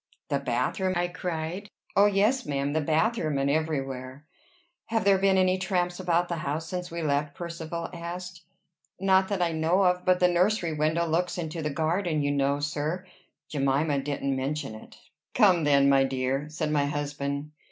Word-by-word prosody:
"The - - +1
bathroom?" 190 -2 -1
I 175 0 0
cried. 175 +2 -4 0.3
"Oh, 200 +1 +6
yes, 210 +6 +2
ma'am! 140 -4 -2
the 160 - +1
bathroom, 160 0 +1
and 140 +1 +1
everywhere." 135 -3 -3 0.6
"Have 225 -2 0
there 195 -1 +5
been 195 0 +3
any 185 0 +3
tramps 180 -1 -1
about 175 -1 +1
the 170 - -3
house 155 +1 -3
since 180 +1 -4
we 170 0 -4
left?" 145 -1 0
Percivale 170 -1 -5
asked. 175 +1 -7 0.6
"Not 190 0 +3
that 195 -3 0
I 170 - +1
know 165 +4 +2
of; 180 -1 +2
but 185 -1 +3
the 180 - +5
nursery 180 -1 +1
window 155 +3 +1
looks 170 +3 0
into 165 -1 -4
the 150 - -1
garden, 160 +1 0
you 145 - +1
know, 140 0 +1
sir. 150 +5 -2 0.4
Jemima 140 +1 +1
didn't 140 -1 -2
mention 135 -2 -3
it." 110 - -12 0.4
"Come 185 -8 +5
then, 140 -1 +5
my 135 -1 +5
dear," 135 +2 -1
said 155 0 -2
my 145 -2 +2
husband. 145 0 -3
160 Hz, 175 wpm, -27 LUFS, 145-180 Hz, 0.6 s, Oh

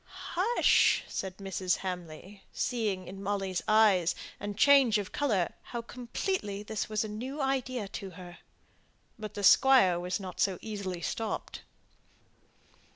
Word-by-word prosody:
"Hush," 415 +8 +3
said 190 -1 -5
Mrs. 190 -2 -1
Hamley, 180 +1 -7
seeing 210 -7 -2
in 195 +1 -8
Molly's 195 -2 -2
eyes 210 -5 +4 0.2
and 205 0 -5
change 275 -4 +6
of 205 -2 -4
colour 215 -12 0
how 235 -1 -6
completely 235 - -3
this 215 0 -4
was 215 0 0
a - - -4
new 250 +8 -6
idea 260 -5 -1
to 195 0 -6
her. 175 -1 -11 0.8
But 215 -1 -7
the 205 - -4
squire 200 -6 +6
was 180 +2 -2
not 185 -2 -8
so 190 -2 +2
easily 200 -5 -5
stopped. 225 -1 -4
205 Hz, 135 wpm, -30 LUFS, 185-235 Hz, 0.8 s, change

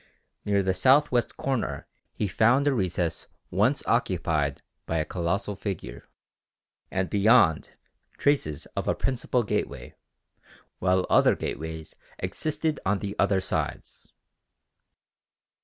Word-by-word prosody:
Near 100 -1 +2
the 95 0 +1
south 135 +10 +4
west 120 -2 0
corner 135 -4 -2 0.3
he 105 - -2
found 120 +8 +3
a 145 - +4
recess 90 -6 -1 0.2
once - - +2
occupied 75 -4 0 0.2
by 80 - -1
a 80 - 0
colossal 100 +4 -2
figure 95 - -6 0.8
and 95 0 -1
beyond 105 -5 +3 0.4
traces 105 - +1
of - - -3
a - - +2
principal 125 -1 0
gateway, 105 - -3 0.9
while 90 0 +2
other - - +4
gateways 80 +1 -6 0.2
existed 155 0 -2
on 100 +2 +1
the 100 +1 -5
other 95 -2 +3
sides. - - -4
100 Hz, 115 wpm, -26 LUFS, 85-125 Hz, 0.9 s, south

